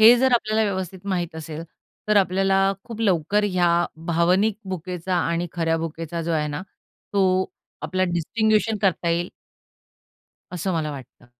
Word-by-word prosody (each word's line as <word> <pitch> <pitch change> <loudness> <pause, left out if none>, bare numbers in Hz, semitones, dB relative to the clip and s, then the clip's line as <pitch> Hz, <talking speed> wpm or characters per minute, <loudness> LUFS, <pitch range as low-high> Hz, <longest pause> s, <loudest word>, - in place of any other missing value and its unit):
हे 225 +2 +10
जर 260 +1 +3
आपल्याला 220 -1 +2
व्यवस्थित 190 -1 -4
माहीत 175 -4 -1
असेल, 160 0 -6 0.5
तर 210 - +4
आपल्याला 195 0 +3
खूप 230 -2 -8
लवकर 200 0 +2
या 180 -3 +2 0.4
भावनिक 180 +5 +3
भुकेचा 180 0 -3
आणि 170 0 0
खऱ्या 165 -1 +1
भुकेचा 165 +1 -4
जो 165 +1 -1
आहे 155 -2 +1
ना, 145 +4 -4 0.5
तो 190 -2 +3 0.4
आपला 185 0 0
डिस्टिंग्विशन 215 +5 +1
करता 180 -3 +2
येईल. 175 +1 0 1.2
असं 180 +1 -2
मला 155 -2 -1
वाटतं. 130 -3 -11
185 Hz, 140 wpm, -23 LUFS, 165-200 Hz, 1.2 s, हे